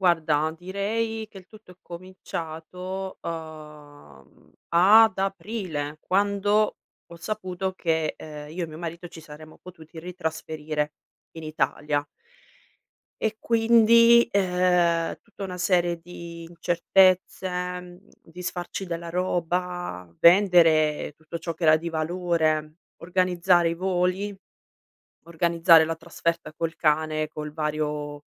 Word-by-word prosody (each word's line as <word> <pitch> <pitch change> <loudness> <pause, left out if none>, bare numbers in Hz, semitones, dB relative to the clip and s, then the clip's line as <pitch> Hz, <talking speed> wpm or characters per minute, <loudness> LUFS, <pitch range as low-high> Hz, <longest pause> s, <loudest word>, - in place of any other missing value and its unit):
Guarda, 160 -4 +2
direi 215 +5 -3
che 200 - -17
il 185 -1 -12
tutto 215 -3 -16
è - - -22
cominciato, 180 +1 -7
uhm, 150 - -10 0.2
ad 210 +5 +6
aprile, 190 -7 -3
quando 205 +2 +1 0.3
ho 170 - -12
saputo 185 0 -4
che, 160 -3 -1
ehm, 150 -1 -9
io 175 +2 -3
e - - -5
mio 155 0 -10
marito 170 +1 -6
ci 165 - -12
saremmo 155 0 -13
potuti 165 -2 -12
ritrasferire 160 -3 -4 0.4
in 160 - -9
Italia. 145 -1 -1 1.2
E 220 0 0
quindi, 230 +1 +5
ehm, 180 -3 +2
tutta 210 -3 -10
una 180 -1 -6
serie 175 -2 +1
di 170 -1 -10
incertezze, 180 +3 +2
mhmm, 180 0 -5 0.2
disfarci 180 +2 -6
della 170 0 -5
roba, 175 - -2
vendere 165 -5 +5
tutto 160 +2 -7
ciò 165 0 -4
che 165 - -6
era 155 0 +7
di 170 +2 -5
valore, 160 -2 -1 0.3
organizzare 180 -1 +2
i 165 - -1
voli, 185 +2 -1 0.9
organizzare 165 -1 +4
la 165 - -2
trasferta 165 -1 -3
col 165 +1 -3
cane, 155 0 +1
col 150 -1 -7
vario 150 -1 -3
170 Hz, 115 wpm, -25 LUFS, 155-185 Hz, 1.2 s, era